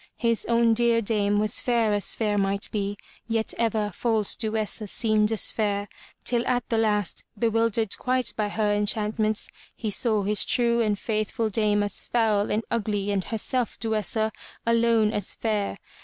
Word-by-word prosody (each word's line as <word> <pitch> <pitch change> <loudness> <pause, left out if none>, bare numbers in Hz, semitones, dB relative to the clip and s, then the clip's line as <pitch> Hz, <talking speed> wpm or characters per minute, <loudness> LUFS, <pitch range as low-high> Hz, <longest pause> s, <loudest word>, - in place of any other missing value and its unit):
His 230 -2 +1
own 235 -1 +3
dear 235 0 +3
dame 205 -2 +1
was 210 0 +2
fair 235 -4 +1
as 205 -1 +1
fair 210 -2 0
might 200 0 0
be, 205 -1 -2 0.3
yet 225 -1 -1
ever 220 -2 0
false 220 0 0
Duessa 215 -1 -1
seemed 215 0 +2
as 220 - +1
fair, 205 -2 -1 0.4
till 240 -1 +1
at 245 -1 0
the 225 - +1
last, 210 -4 0
bewildered 225 -1 +1
quite 255 0 +1
by 210 -1 -1
her 210 0 0
enchant 210 +1 0
ments, 215 0 +1 0.2
he 220 -3 -3
saw 215 -1 +2
his 210 +1 +3
true 235 -1 +2
and 210 -2 +1
faithful 215 +1 -2
dame 205 -1 +2
as 205 - -2
foul 215 -3 +1
and 215 +2 0
ugly 205 -3 -1
and 195 -2 -1
herself, 235 +1 -1
Duessa, 220 0 0 0.3
alone 230 -2 +3
as 205 -2 -2
fair. 210 -3 -2
215 Hz, 165 wpm, -25 LUFS, 205-230 Hz, 0.4 s, own